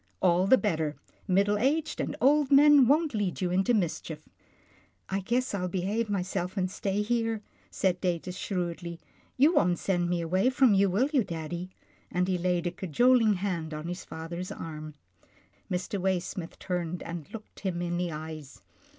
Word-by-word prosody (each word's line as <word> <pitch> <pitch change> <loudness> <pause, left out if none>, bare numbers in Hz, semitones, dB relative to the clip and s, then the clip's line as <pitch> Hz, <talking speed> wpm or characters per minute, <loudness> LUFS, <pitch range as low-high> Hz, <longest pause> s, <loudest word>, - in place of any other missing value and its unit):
" - - -43
All 180 +2 +4
the 260 - +7
better. 160 -9 -1 0.3
Middle 200 +2 +2
aged 290 +6 0
and - - -3
old 290 +1 +3
men 285 -2 +7
won't 300 +2 +3
lead 205 -4 -1
you 180 -2 -1
into 190 +6 +2
mischief." 160 -5 -3 0.4
" - - -30 0.3
I 195 - 0
guess 240 +6 -1
I'll 180 -2 -1
behave 200 +5 -1
myself 185 -1 -2
and 185 -1 0
stay 200 +1 -1
here," 225 -1 -1 0.3
said 180 -2 0
Datus 180 0 -2
shrewdly. 175 -3 -4 0.2
" - - -34
You 290 +6 +5
won't 180 - +3
send 175 -2 0
me 175 0 0
away 185 +8 +2
from 260 -3 +4
you, 195 0 +4
will 230 +10 +2
you, 265 -5 +4
daddy," 170 0 -5 0.4
and 180 +1 0
he 185 -1 0
laid 175 -1 0
a 175 - 0
cajoling 220 - +3
hand 175 -5 -3
on 155 +2 -6
his 180 +2 -5
father's 170 +3 -6
arm. 155 -2 -7 0.7
Mr. 185 +2 -2
Waysmith 185 -2 -2
turned 175 -1 -3
and 170 -4 -7
looked 220 -1 -10
him 185 -3 -2
in 175 0 -2
the 175 -1 -1
eyes. 155 -2 -8
185 Hz, 175 wpm, -28 LUFS, 175-215 Hz, 0.7 s, the